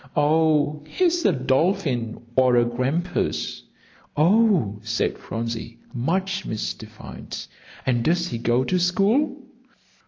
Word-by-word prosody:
"Oh, 150 -1 +2
he's 350 - +1
a - - +6
dolphin 130 - 0 0.2
or 130 -1 +4
a 120 0 +4
grampus." 135 +9 -1 0.6
"Oh," 170 - +3
said 110 +1 -1
Phronsie, 115 0 -5 0.2
much 190 +10 -1
mystified, 110 - -6 0.5
"and 120 -3 +1
does 175 +3 +1
he 115 - -4
go 120 +2 +2
to 180 +7 0
school?" 225 - +1
150 Hz, 105 wpm, -23 LUFS, 120-185 Hz, 0.6 s, a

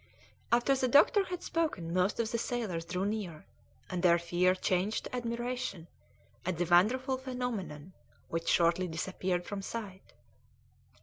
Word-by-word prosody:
After 240 +3 +4
the 260 -1 +1
doctor 300 - +5
had 360 -1 -5
spoken 250 - -1
most 185 +4 +1
of 230 -1 0
the 235 - 0
sailors 215 -10 -2
drew 180 +2 -2
near, 200 -7 -4 0.4
and 180 -2 -3
their 175 -1 +5
fear 175 +2 +2
changed 185 +3 0
to - - -6
admiration 240 -6 -3 0.6
at 185 -1 -2
the 175 - +1
wonderful 245 - +3
phenomenon, 225 - -4 0.3
which 165 0 -3
shortly 175 +2 +3
disappeared 180 +2 -2
from 205 -1 -4
sight. 195 -2 -7
190 Hz, 140 wpm, -31 LUFS, 175-240 Hz, 0.6 s, doctor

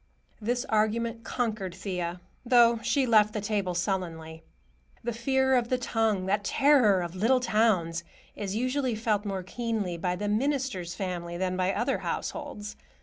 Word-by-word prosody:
This 245 +4 -1
argument 230 +2 0
conquered 215 -7 -2
Thea, 180 -2 -4 0.2
though 235 -2 +5
she 275 +3 +1
left 215 -3 +4
the 215 - -1
table 200 -3 -1
sullenly. 165 -3 -3 0.6
The 240 0 -2
fear 265 +3 +2
of 240 -2 +1
the 255 - +2
tongue, 225 -5 0
that 200 +2 0
terror 225 -6 +4
of 170 -1 -5
little 230 +7 +3
towns, 210 -8 +1 0.3
is 200 -1 -4
usually 255 +1 0
felt 215 -1 0
more 195 -2 -3
keenly 215 -3 -3
by 180 +1 -1
the 205 +3 -3
minister's 230 -6 -1
family 175 -3 -4
than 185 0 -1
by 185 +1 +1
other - - 0
households. 250 -9 -5
210 Hz, 150 wpm, -28 LUFS, 185-240 Hz, 0.6 s, though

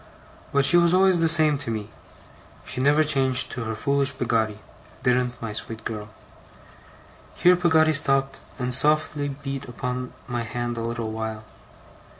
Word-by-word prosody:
But 140 -1 +2
she 175 - +7
was 170 0 +3
always 190 -1 +3
the 165 - +2
same 155 -3 +4
to 130 - -6
me. 110 -2 -5 0.8
She 125 - -2
never 145 +3 +3
changed 135 -3 +3
to 115 - -5
her 110 0 -4
foolish 140 +4 +1
Peggotty, 110 -3 -1 0.5
didn't 125 -1 0
my 115 -2 -6
sweet 110 +1 -6
girl.' 105 -2 -6 1.3
Here 180 +1 +4
Peggotty 160 -3 +2
stopped, 135 -1 +1 0.2
and 125 -1 0
softly 150 +1 +3
beat 135 0 -7
upon 125 +1 -5 0.2
my 120 -1 -3
hand 120 +1 -5
a 115 - -5
little 115 -1 -4
while. 110 -1 -6
130 Hz, 155 wpm, -23 LUFS, 115-150 Hz, 1.3 s, she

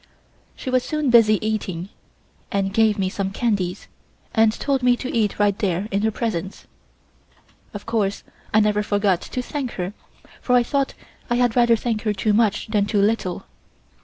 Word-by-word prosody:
She 260 - -5
was 255 -1 +2
soon 305 -4 -1
busy 220 -3 +6
eating, 195 -4 -3 0.6
and 195 -1 -1
gave 220 0 +3
me 190 -2 0
some 190 +1 -2
candies, 195 -3 -2 0.5
and 225 -1 +4
told 270 +4 -1
me 250 -1 +3
to 255 - -5
eat 215 -3 +1
right 205 -1 +2
there 190 0 -1
in 200 0 0
her 220 - +2
presence. 205 -4 -4 1.1
Of 205 - -8
course 210 -4 -1 0.3
I 215 - +4
never 210 0 +2
forgot 205 -3 +1
to 250 - -4
thank 270 -2 -4
her, 180 +2 -4 0.5
for 250 - +2
I 245 - +5
thought 275 +2 -1 0.3
I 240 - +2
had 245 -2 +2
rather 240 -1 +5
thank 225 -1 -2
her 215 -2 0
too 210 +2 0
much 210 -1 +2
than 205 -2 +1
too 205 -1 +1
little. 200 -3 0
215 Hz, 175 wpm, -22 LUFS, 200-235 Hz, 1.1 s, busy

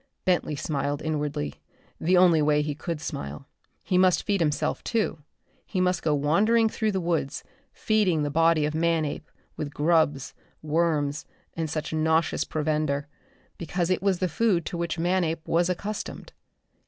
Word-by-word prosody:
Bentley 180 -4 +1
smiled 145 0 -2
inwardly, 145 - -3 0.4
the 180 +3 +3
only 175 -3 +5
way 150 0 +3
he 150 0 -2
could 165 +2 -4
smile. 140 -2 -6 0.4
He 185 -2 +1
must 185 -1 +4
feed 200 -3 0
himself, 150 -3 0
too. 220 -8 -1 0.4
He 190 - -3
must 180 -1 +1
go 155 -2 +1
wandering 215 +11 +3
through 215 -1 -1
the 190 - 0
woods, 165 -5 -1 0.3
feeding 195 -8 +1
the 145 - -1
body 165 0 +3
of 150 - -2
Manape 160 -1 0 0.3
with 145 -1 -4
grubs, 150 -3 +2 0.3
worms 150 -2 0 0.3
and 165 -1 -2
such 155 +1 -3
nauseous 160 +1 +1
provender, 150 -2 -1 0.5
because 175 +1 -1
it 185 - +1
was 195 -2 +2
the 185 - 0
food 180 0 +1
to 175 - -4
which 170 -1 -2
Manape 165 -2 0
was 175 +2 +2
accustomed. 205 +4 -5
165 Hz, 155 wpm, -26 LUFS, 150-180 Hz, 0.5 s, only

